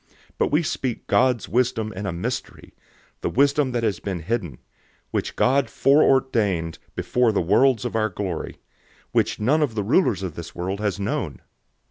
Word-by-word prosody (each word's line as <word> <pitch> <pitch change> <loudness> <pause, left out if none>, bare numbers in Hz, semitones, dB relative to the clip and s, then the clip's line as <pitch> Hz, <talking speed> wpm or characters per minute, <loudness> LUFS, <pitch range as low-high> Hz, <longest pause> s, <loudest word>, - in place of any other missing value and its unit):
002:007 - - -39 0.3
But - - +3
we 155 +4 +3
speak 130 -5 -3
God's 125 -3 +2
wisdom 115 -3 0
in 100 +2 -5
a - - -1
mystery, 85 +1 -5 0.5
the - - -1
wisdom 140 0 +2
that 120 -1 -1
has 105 -5 0
been 95 -4 -4
hidden, 85 - -3 0.5
which - - -2
God 135 +2 +2
foreordained 115 - +2 0.2
before 125 -2 +1
the 105 - +1
worlds 115 +8 +3
for 120 - -3
our 110 -1 +1
glory, 95 -7 -4
002:008 - - -27 0.5
which - - +1
none 140 +9 +2
of 135 -7 0
the 105 - -1
rulers 115 - +2
of 90 -4 -4
this 85 +1 -9
world 95 +3 -3
has 105 -2 -1
known. 100 - -2
110 Hz, 175 wpm, -23 LUFS, 95-130 Hz, 0.5 s, But